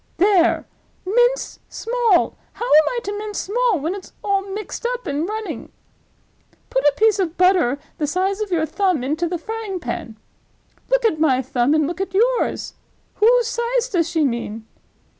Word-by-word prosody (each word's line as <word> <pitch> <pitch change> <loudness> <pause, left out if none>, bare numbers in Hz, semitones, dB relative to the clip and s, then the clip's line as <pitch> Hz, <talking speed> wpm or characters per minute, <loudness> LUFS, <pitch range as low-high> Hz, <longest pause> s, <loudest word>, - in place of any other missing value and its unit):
'—There! 375 -2 +3 0.4
mince 485 +5 +1
small! 460 -5 +1 0.2
How 475 - -5
am 310 -10 +6
I - - 0
to 405 +1 -4
mince 420 -1 -5
small 460 -2 +1
when 320 +6 -2
it's 395 -1 -9
all 400 -1 +1
mixed 395 +3 -6
up - - -10
and 300 +3 -2
running? 435 0 -5 1.0
'Put 265 - +1
a 290 - +4
piece 435 -1 +3
of 350 -3 -1
butter 360 -8 +3 0.2
the 300 - 0
size 380 +6 0
of 425 - -2
your 325 -3 +2
thumb 360 -3 0
into 310 +6 -1
the 350 +1 -2
frying 420 +1 -5
pan.'—Look 245 - -5
at 320 -9 +2
my 265 -5 +3
thumb, 255 +3 +1
and 310 -1 +3
look 345 +5 -4
at 380 -1 -4
yours! 480 +4 +1 0.4
whose 475 +3 +5
size 475 +1 -1
does 335 -4 +1
she 325 -3 +1
mean? 230 -3 -3
380 Hz, 165 wpm, -21 LUFS, 310-440 Hz, 1.0 s, am